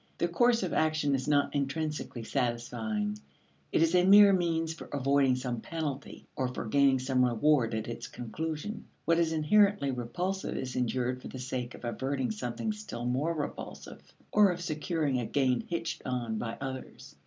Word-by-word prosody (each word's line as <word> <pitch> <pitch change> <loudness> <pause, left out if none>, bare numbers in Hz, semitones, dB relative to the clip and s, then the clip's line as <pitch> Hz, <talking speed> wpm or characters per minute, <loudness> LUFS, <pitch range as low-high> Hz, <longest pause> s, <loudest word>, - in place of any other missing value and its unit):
The 170 - +1
course 230 +6 +3
of 185 - -2
action 155 -2 +2
is 135 0 -1
not 145 -1 +2
intrinsically 145 -3 -2
satisfying; 115 -4 -2 0.5
it - - +3
is 165 +1 +2
a 180 0 +5
mere 200 +1 +8
means 165 -3 0
for - - -10
avoiding 140 -1 +2
some 125 -2 -3
penalty, 150 -3 -5
or 130 - 0
for 125 - -5
gaining 135 +3 +4
some 130 0 +1
reward 125 -1 +3
at 110 0 -3
its 115 0 -5
conclusion. 155 - -5 0.2
What 165 0 +3
is 165 -1 +2
inherently 160 0 +3
repulsive 175 +11 -3
is 130 -1 -4
endured 125 +1 -1
for - - -8
the - - -8
sake 125 -1 -4
of - - -10
averting 130 +1 -1
something 120 - -3
still 210 - -6
more 140 +7 0
repulsive 150 -2 -6 0.3
or 210 -1 +6
of 180 -1 -2
securing 155 -4 -1
a 120 - -2
gain 130 -3 +1
hitched 170 -1 -3
on 120 -4 -2
by 115 -1 -4
others. 130 -1 -7
140 Hz, 170 wpm, -30 LUFS, 125-165 Hz, 0.5 s, mere